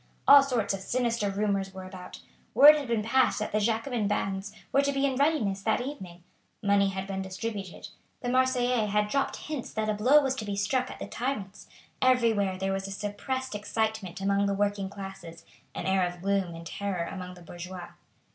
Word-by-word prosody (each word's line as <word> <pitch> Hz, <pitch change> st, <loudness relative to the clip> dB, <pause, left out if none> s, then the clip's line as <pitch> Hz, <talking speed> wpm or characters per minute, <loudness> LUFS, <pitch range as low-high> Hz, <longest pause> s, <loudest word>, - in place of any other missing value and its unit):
All 280 Hz, 0 st, +10 dB
sorts 250 Hz, -7 st, 0 dB
of 195 Hz, -, -3 dB
sinister 235 Hz, 0 st, 0 dB
rumours 195 Hz, -1 st, -1 dB
were 190 Hz, -, -7 dB
about. 185 Hz, -1 st, -10 dB, 0.3 s
Word 295 Hz, +2 st, +10 dB
had 290 Hz, -3 st, -3 dB
been 230 Hz, -2 st, 0 dB
passed 260 Hz, +4 st, +3 dB
that 215 Hz, -, -3 dB
the 215 Hz, -, +1 dB
Jacobin 225 Hz, +1 st, 0 dB
bands 195 Hz, -1 st, -2 dB, 0.2 s
were 275 Hz, -, +4 dB
to 280 Hz, 0 st, +1 dB
be 275 Hz, 0 st, +1 dB
in 270 Hz, -2 st, 0 dB
readiness 260 Hz, -9 st, +1 dB
that 220 Hz, +2 st, +1 dB
evening. 190 Hz, -10 st, -7 dB, 0.4 s
Money 200 Hz, -1 st, +3 dB
had 190 Hz, 0 st, -4 dB
been 195 Hz, -1 st, -4 dB
distributed. 190 Hz, 0 st, -6 dB, 0.3 s
The 245 Hz, -, -2 dB
Marseillais 250 Hz, -3 st, +2 dB
had 210 Hz, 0 st, +1 dB
dropped 275 Hz, +4 st, 0 dB
hints 300 Hz, -5 st, -6 dB
that 215 Hz, 0 st, -1 dB
a -, -, +2 dB
blow 250 Hz, +8 st, +5 dB
was 265 Hz, -1 st, +1 dB
to 215 Hz, -, -4 dB
be 205 Hz, -1 st, -3 dB
struck 250 Hz, +6 st, 0 dB
at -, -, -8 dB
the -, -, -6 dB
tyrants. 215 Hz, -6 st, -4 dB, 0.3 s
Everywhere 230 Hz, -7 st, +3 dB
there 195 Hz, +1 st, -1 dB
was 195 Hz, 0 st, -3 dB
a -, -, -7 dB
suppressed 210 Hz, +6 st, -4 dB
excitement 210 Hz, -3 st, -2 dB
among 200 Hz, +1 st, +1 dB
the 200 Hz, -, 0 dB
working 200 Hz, -1 st, 0 dB
classes; 195 Hz, -4 st, -9 dB, 0.3 s
an -, -, -4 dB
air 190 Hz, 0 st, +2 dB
of 175 Hz, 0 st, -9 dB
gloom 195 Hz, -3 st, 0 dB
and 165 Hz, 0 st, -9 dB
terror 190 Hz, 0 st, -3 dB
among 180 Hz, +1 st, -7 dB
the 175 Hz, -, -14 dB
bourgeois. 175 Hz, +1 st, -8 dB
205 Hz, 195 wpm, -28 LUFS, 195-245 Hz, 0.4 s, All